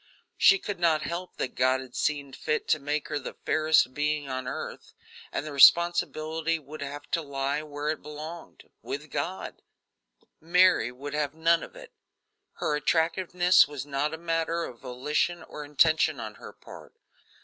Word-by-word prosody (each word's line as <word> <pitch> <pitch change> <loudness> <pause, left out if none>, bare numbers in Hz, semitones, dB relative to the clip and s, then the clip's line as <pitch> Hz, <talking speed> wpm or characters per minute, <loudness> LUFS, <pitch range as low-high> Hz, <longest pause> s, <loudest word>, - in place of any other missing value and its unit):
She 375 - +6
could 205 - -5
not 160 -3 +2
help 175 +2 -5
that 125 - -3
God 130 +1 +2
had 130 -2 -10
seen 145 -2 -1
fit 150 - -2
to 155 - +3
make 150 +1 -3
her 145 - -1
the 135 - -8
fairest 155 -4 +3
being 150 0 -1
on 130 -1 -4
earth, 130 - -6 0.4
and - - -3
the 155 - -6
responsibility 165 +1 +4
would 155 0 -11
have 145 +1 -6
to 165 - +1
lie 140 0 -2
where 150 0 -5
it 155 - -2
belonged 155 +3 -9
with 150 +2 -6
God; 185 +3 -4 0.8
Mary 175 -7 +4
would 140 +3 -8
have 150 0 -1
none 165 +1 +3
of - - -10
it. - - -12 0.6
Her 150 - -1
attractiveness 170 +1 +3
was 145 -2 -6
not 145 +1 -1
a 160 - -5
matter 165 0 -1
of 120 -7 -8
volition 150 +7 -2
or 150 - -8
intention 155 +2 +3
on - - -6
her - - -9
part. - - -14
150 Hz, 165 wpm, -27 LUFS, 140-165 Hz, 0.8 s, She